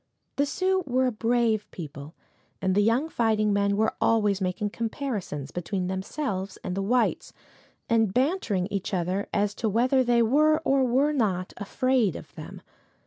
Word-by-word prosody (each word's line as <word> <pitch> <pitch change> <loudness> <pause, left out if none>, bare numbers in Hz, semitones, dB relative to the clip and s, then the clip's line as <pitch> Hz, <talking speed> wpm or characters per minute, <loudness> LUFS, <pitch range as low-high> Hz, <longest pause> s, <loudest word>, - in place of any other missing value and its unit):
The 285 +1 +2
Sioux 375 +4 0
were 260 0 +2
a 255 - +1
brave 225 -2 0
people, 150 -2 -9 0.4
and 190 -1 0
the 205 - +3
young 230 +8 +2
fighting 220 -7 +1
men 200 0 +1
were 220 +1 +1
always 210 -3 +2
making 190 +3 -2
comparisons 220 - -4
between 180 +2 -3
themselves 190 +1 -3
and 180 - -3
the 195 - -1
whites, 240 +5 0 0.5
and 225 -5 +2
bantering 250 - 0
each 200 0 -2
other 185 +3 -2
as 205 0 0
to 220 +1 -2
whether 255 +5 +3
they 240 -1 +3
were 305 +6 +4
or 270 0 +3
were 270 +5 +2
not 190 -9 -1
afraid 240 - +1
of - - -10
them. - - -10
220 Hz, 160 wpm, -26 LUFS, 195-255 Hz, 0.5 s, were